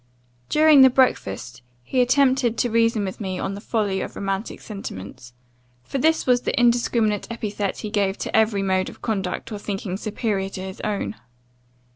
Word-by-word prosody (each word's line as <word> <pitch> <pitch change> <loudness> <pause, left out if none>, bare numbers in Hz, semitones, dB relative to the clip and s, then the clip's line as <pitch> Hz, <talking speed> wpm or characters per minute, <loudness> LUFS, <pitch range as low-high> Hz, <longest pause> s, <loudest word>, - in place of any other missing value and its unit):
"During 305 -2 +6
the 265 - +9
breakfast, 125 - 0 0.2
he 255 - +1
attempted 255 -2 +3
to 240 - 0
reason 230 -2 +2
with 190 +3 -6
me 190 -2 -3
on 195 +2 -3
the 200 - -7
folly 205 -4 -1
of - - -6
romantic 195 +2 -3
sentiments; 120 - -8 0.5
for 270 - -4
this 320 +4 +2
was 245 -1 +3
the 280 - -1
indiscriminate 235 -3 +2
epithet 210 -3 -3
he 210 - -6
gave 200 -2 0
to - - -4
every 220 -3 +3
mode 190 -1 +1
of - - -15
conduct 195 -2 -2
or 210 - -5
thinking 195 -2 -4
superior 210 -2 -2
to 190 - -7
his 190 0 -7
own. 210 +1 -3
210 Hz, 170 wpm, -23 LUFS, 195-240 Hz, 0.5 s, the